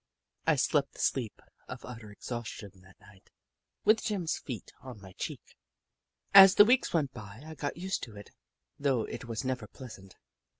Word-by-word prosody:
I - - +5
slept - - +1
the - - -16
sleep 120 -5 -1 0.2
of - - -8
utter 115 -4 -9
exhaustion 110 -2 -7
that 95 +1 -20
night 100 -3 -20 0.3
— - - -51
with 220 +1 +5
Jim's 185 -6 -1
feet 120 -8 -8
on 125 -4 -10
my 95 -2 -12
cheek. - - -7 0.8
As 195 0 +10
the 205 - +9
weeks 250 +3 +3
went 150 -6 0
by, 110 +1 -10
I 160 - -8
got 145 -1 -4
used 190 +2 -2
to 115 -4 -14
it, 100 0 -12 0.5
though 135 -5 +1
it - - -7
was 115 +2 -4
never 130 -4 -2
pleasant. 100 -8 -12
125 Hz, 175 wpm, -30 LUFS, 105-160 Hz, 0.8 s, As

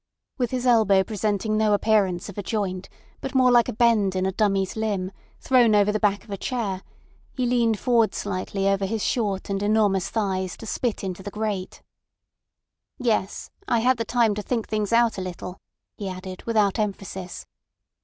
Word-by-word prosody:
With 245 -2 +1
his 255 -1 -2
elbow 215 -6 +5
presenting 215 0 -1
no 215 -1 +3
appearance 200 -4 +1
of 205 - -9
a - - -1
joint, 195 -3 -3 0.3
but 270 - -6
more 255 -1 +5
like 240 0 +5
a - - -3
bend 215 -4 +3
in 185 0 0
a 190 - +1
dummy's 195 -1 0
limb, 205 -4 -2 0.3
thrown 240 -5 +4
over 205 0 +4
the 215 - -1
back 205 -2 +1
of - - -14
a 200 - -3
chair, 205 -5 -3 0.5
he 255 - -1
leaned 235 -3 +2
forward 230 +1 +2
slightly 195 0 -2
over 195 0 +1
his 220 +1 -2
short 205 -6 -1
and 195 0 -2
enormous 205 -3 +2
thighs 190 -4 -2
to - - -10
spit 230 0 -2
into 190 -1 -4
the 195 - -6
grate. 205 -3 -4 1.1
"Yes! 225 -6 -1 0.2
I 235 -2 +2
had 255 +1 +3
the 230 - -1
time 230 -2 +2
to 210 - -3
think 230 +1 -2
things 215 -1 -1
out 230 -3 +3
a - - -3
little," 180 0 -7 0.4
he 200 -2 -5
added 185 0 -8
without 215 -2 +2
emphasis. 195 -3 -4
210 Hz, 185 wpm, -24 LUFS, 195-230 Hz, 1.1 s, elbow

